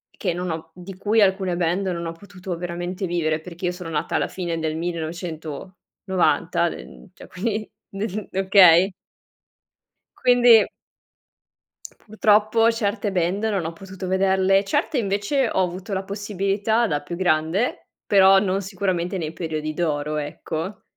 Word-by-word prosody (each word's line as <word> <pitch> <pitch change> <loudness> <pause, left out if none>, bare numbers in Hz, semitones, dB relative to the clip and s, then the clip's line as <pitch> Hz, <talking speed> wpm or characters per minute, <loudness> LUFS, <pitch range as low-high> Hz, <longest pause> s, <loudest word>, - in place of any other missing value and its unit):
che 185 - -1
non 180 0 -3
ho 160 0 -6
di 180 +1 -9
cui 215 +4 +2
alcune 190 -2 +2
band 180 +3 0
non 170 -2 -3
ho 165 - -3
potuto 185 0 -8
veramente 175 +2 -4
vivere. 160 -2 -1
Perché 175 +2 -7
io 175 - +1
sono 180 -2 -8
nata 150 -2 -2
alla - - +1
fine 170 -3 -4
del 160 -1 -2
1990, 170 +2 -2
d - - -6
ehm, - - -12
cioè - - -13
quindi 215 +3 -3 0.3
nel 205 0 -4
okay? 190 -1 +6 1.3
Quindi 245 -3 +6 1.4
purtroppo 215 +1 +3
certe 205 -2 -2
band 185 +3 0
non 200 -6 0
ho 165 - -4
potuto 190 +2 -8
vederle. 190 +1 +3
Certe 290 +6 -1
invece 210 +5 0
ho - - +1
avuto 185 +3 -5
la 190 0 -1
possibilità 205 +3 0
da 145 -5 -1
più 170 +4 -6
grande, 175 +5 0 0.2
però 195 -1 +6
non 195 0 0
sicuramente 190 -1 -2
nei 160 -3 -4
periodi 155 -2 -4
d'oro, 150 -2 -1
ecco. 160 +5 -5
185 Hz, 145 wpm, -23 LUFS, 170-200 Hz, 1.4 s, okay